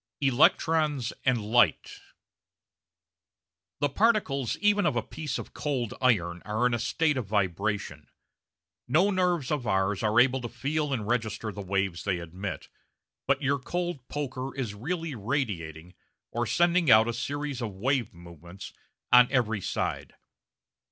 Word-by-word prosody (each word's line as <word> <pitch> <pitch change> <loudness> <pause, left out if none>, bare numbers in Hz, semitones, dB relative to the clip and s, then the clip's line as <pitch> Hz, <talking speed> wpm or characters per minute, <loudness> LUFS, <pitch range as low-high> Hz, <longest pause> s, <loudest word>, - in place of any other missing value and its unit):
Electrons 145 0 +2
and 125 -2 +3
Light 120 +3 +2 1.8
The 145 - +2
particles 155 - +1
even 205 -1 +3
of 145 - 0
a 120 - 0
piece 150 0 -5
of - - -8
cold 130 -7 -2
iron 90 -9 +1
are 110 +3 -1
in 125 - +2
a 120 - 0
state 150 +4 +1
of 120 -6 -3
vibration. 100 -5 -2 0.8
No 175 +11 +3
nerves 180 -7 0
of 140 -6 -1
ours 95 0 +1
are 110 +1 +3
able 130 +1 +3
to 120 - -5
feel 145 +5 -2
and 115 -6 -2
register 110 -2 -1
the 100 - -7
waves 95 -2 -2
they 95 -3 0
emit, 90 +3 -6 0.6
but 140 +2 +1
your 140 +1 +1
cold 175 -2 -4
poker 135 -2 -4
is 125 -7 -3
really 160 - -4
radiating, 95 - -3 0.4
or 120 0 -1
sending 175 - +2
out 110 -1 +7
a 120 - -1
series 145 0 -4
of 110 -5 -4
wave 125 +2 0
movements, 85 +2 -12 0.4
on 125 0 +8
every 115 -6 +1
side. - - -3
125 Hz, 145 wpm, -28 LUFS, 105-145 Hz, 1.8 s, on